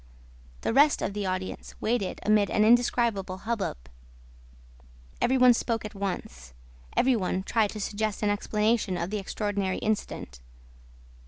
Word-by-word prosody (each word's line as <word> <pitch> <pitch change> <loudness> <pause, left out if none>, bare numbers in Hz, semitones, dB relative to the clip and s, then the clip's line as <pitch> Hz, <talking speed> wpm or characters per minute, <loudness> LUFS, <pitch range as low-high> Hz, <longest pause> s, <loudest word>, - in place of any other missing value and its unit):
The - - -1
rest 290 +3 +4
of - - -2
the 205 -1 -2
audience 185 0 -4
waited 220 -4 -1
amid 210 -2 +3
an 210 +5 +3
indescribable 230 -5 +2
hubbub. 225 - -2 1.4
Every 260 +2 +3
one 250 -1 +7
spoke 230 -1 -2
at 210 - -7
once. 65 - -5 0.4
Every 255 0 +4
one 185 -2 -1
tried 220 0 +1
to 215 - -6
suggest 210 +1 -2
an 205 - +3
explanation 210 -1 0
of 170 +2 -3
the 210 - -1
extraordinary 200 -1 -2
incident. 205 - -3
210 Hz, 140 wpm, -27 LUFS, 190-230 Hz, 1.4 s, one